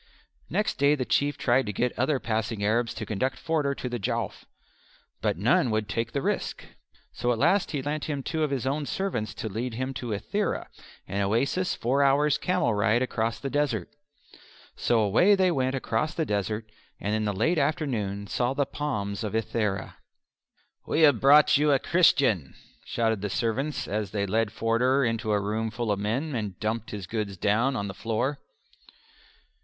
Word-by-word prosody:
Next 210 Hz, -8 st, -1 dB
day 140 Hz, +1 st, +5 dB
the 130 Hz, -3 st, -2 dB
Chief 145 Hz, +3 st, +1 dB
tried 125 Hz, 0 st, +2 dB
to -, -, -1 dB
get 125 Hz, +5 st, 0 dB
other 130 Hz, +2 st, +1 dB
passing 110 Hz, -2 st, -2 dB
Arabs 115 Hz, +2 st, +1 dB
to -, -, -4 dB
conduct 130 Hz, +5 st, -1 dB
Forder 150 Hz, -4 st, 0 dB
to 125 Hz, -, -5 dB
the 120 Hz, -1 st, -3 dB
Jowf, 100 Hz, -, -3 dB, 0.8 s
but -, -, 0 dB
none 120 Hz, +5 st, +3 dB
would 110 Hz, -1 st, 0 dB
take 115 Hz, +1 st, -2 dB
the 140 Hz, -, -2 dB
risk. -, -, -2 dB, 0.5 s
So 120 Hz, +2 st, -1 dB
at 120 Hz, -, 0 dB
last 175 Hz, -, +3 dB
he 145 Hz, -4 st, -3 dB
lent 150 Hz, +2 st, -2 dB
him 145 Hz, -3 st, -3 dB
two 160 Hz, +3 st, -2 dB
of 155 Hz, -, +2 dB
his 135 Hz, -3 st, -2 dB
own 140 Hz, +2 st, -1 dB
servants 125 Hz, -, -2 dB
to -, -, -4 dB
lead 115 Hz, +3 st, -4 dB
him 130 Hz, +2 st, -3 dB
to 125 Hz, -2 st, -5 dB
Ithera 200 Hz, -, -2 dB, 0.4 s
an 100 Hz, -, -2 dB
oasis 135 Hz, -, +1 dB
four 130 Hz, +4 st, +1 dB
hours' 140 Hz, +2 st, +3 dB
camel 180 Hz, -11 st, +1 dB
ride 110 Hz, +4 st, +2 dB
across 115 Hz, -2 st, -1 dB
the 135 Hz, -, -4 dB
desert. 135 Hz, -9 st, 0 dB, 0.8 s
So 115 Hz, -2 st, +2 dB
away 115 Hz, -, +5 dB
they 185 Hz, -2 st, +3 dB
went 130 Hz, -3 st, 0 dB
across 155 Hz, +4 st, -1 dB
the 160 Hz, -, 0 dB
desert 105 Hz, 0 st, -2 dB, 0.3 s
and 105 Hz, -, -2 dB
in 110 Hz, 0 st, 0 dB
the 105 Hz, -, +1 dB
late 135 Hz, -, +1 dB
afternoon 120 Hz, -10 st, -1 dB
saw 120 Hz, +5 st, -1 dB
the 140 Hz, -, +1 dB
palms 105 Hz, -10 st, -3 dB
of 105 Hz, 0 st, -3 dB
Ithera. 110 Hz, -3 st, -2 dB, 0.9 s
"We 160 Hz, -, +1 dB
have 145 Hz, -7 st, +6 dB
brought 145 Hz, +2 st, +7 dB
you 150 Hz, 0 st, +3 dB
a 140 Hz, -, +5 dB
Christian," 135 Hz, -, +3 dB, 0.3 s
shouted 110 Hz, -3 st, 0 dB
the 105 Hz, -, -2 dB
servants 125 Hz, +8 st, -1 dB
as 105 Hz, -1 st, -2 dB
they 100 Hz, -1 st, -1 dB
led 110 Hz, +2 st, 0 dB
Forder 125 Hz, +5 st, +2 dB
into 115 Hz, -1 st, -1 dB
a 105 Hz, -, +3 dB
room 110 Hz, +2 st, -1 dB
full 115 Hz, 0 st, -2 dB
of 100 Hz, -, 0 dB
men, 125 Hz, +9 st, -1 dB
and 105 Hz, -6 st, -4 dB
dumped 110 Hz, +1 st, -2 dB
his 100 Hz, -3 st, -6 dB
goods 100 Hz, 0 st, -3 dB
down 115 Hz, +9 st, +2 dB
on 100 Hz, -4 st, -2 dB
the 95 Hz, -, -5 dB
floor. 115 Hz, +7 st, -2 dB
120 Hz, 185 wpm, -27 LUFS, 105-140 Hz, 0.9 s, brought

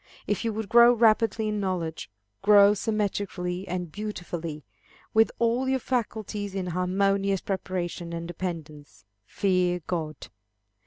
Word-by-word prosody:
If 205 Hz, -, -1 dB
you 230 Hz, -, 0 dB
would 220 Hz, 0 st, -4 dB
grow 235 Hz, +2 st, +7 dB
rapidly 220 Hz, -1 st, +3 dB
in 210 Hz, 0 st, -1 dB
knowledge, 175 Hz, -, -3 dB, 0.3 s
grow 205 Hz, 0 st, +7 dB
symmetrically 200 Hz, -4 st, -2 dB
and 180 Hz, -3 st, -4 dB
beautifully, 175 Hz, -7 st, -5 dB, 0.5 s
with 220 Hz, 0 st, +4 dB
all 235 Hz, +3 st, +1 dB
your 265 Hz, -, +2 dB
faculties 215 Hz, -5 st, -3 dB
in 190 Hz, -2 st, -2 dB
harmonious 195 Hz, +2 st, +1 dB
preparation 180 Hz, -3 st, -3 dB
and 170 Hz, 0 st, -5 dB
dependence, 160 Hz, -, -7 dB, 0.2 s
fear 180 Hz, -2 st, +1 dB
God. 160 Hz, -3 st, -3 dB
195 Hz, 120 wpm, -26 LUFS, 175-215 Hz, 0.5 s, grow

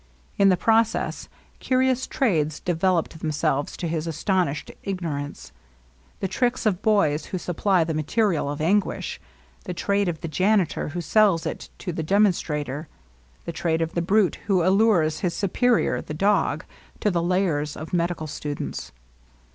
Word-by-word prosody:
In 200 Hz, 0 st, +6 dB
the 185 Hz, -, +4 dB
process, 225 Hz, +2 st, +1 dB, 0.3 s
curious 260 Hz, 0 st, +1 dB
trades 155 Hz, -, 0 dB
developed 175 Hz, -1 st, 0 dB
themselves 150 Hz, -2 st, -1 dB
to 175 Hz, -, -3 dB
his 160 Hz, 0 st, -2 dB
astonished 165 Hz, -3 st, -1 dB
ignorance: 160 Hz, -7 st, -4 dB, 0.7 s
the 195 Hz, -, 0 dB
tricks 245 Hz, +6 st, 0 dB
of 200 Hz, -3 st, +1 dB
boys 180 Hz, -9 st, +2 dB
who 185 Hz, -, -4 dB
supply 180 Hz, +1 st, +1 dB
the 160 Hz, 0 st, -2 dB
material 160 Hz, 0 st, 0 dB
of 145 Hz, +1 st, -4 dB
anguish; 190 Hz, +5 st, 0 dB, 0.4 s
the 180 Hz, -, -4 dB
trade 200 Hz, +2 st, +1 dB
of 160 Hz, -2 st, -5 dB
the 165 Hz, -, -3 dB
janitor 190 Hz, +2 st, +1 dB
who 175 Hz, +4 st, -4 dB
sells 200 Hz, -2 st, +3 dB
it -, -, -5 dB
to 180 Hz, -, -5 dB
the 160 Hz, -, -3 dB
demonstrator; 155 Hz, -6 st, +1 dB, 0.6 s
the -, -, -4 dB
trade 165 Hz, -1 st, 0 dB
of 165 Hz, -, -4 dB
the 170 Hz, -, 0 dB
brute 195 Hz, +2 st, +2 dB
who 190 Hz, -4 st, +3 dB
allures 185 Hz, -6 st, +3 dB
his 175 Hz, -2 st, -1 dB
superior, 235 Hz, +4 st, +1 dB
the 150 Hz, -, -7 dB
dog, 200 Hz, +6 st, +1 dB, 0.3 s
to 210 Hz, -, +1 dB
the 170 Hz, -2 st, 0 dB
lairs 170 Hz, -4 st, 0 dB
of 155 Hz, +3 st, -8 dB
medical 170 Hz, -2 st, 0 dB
students. 145 Hz, -1 st, -5 dB
175 Hz, 150 wpm, -24 LUFS, 155-200 Hz, 0.7 s, In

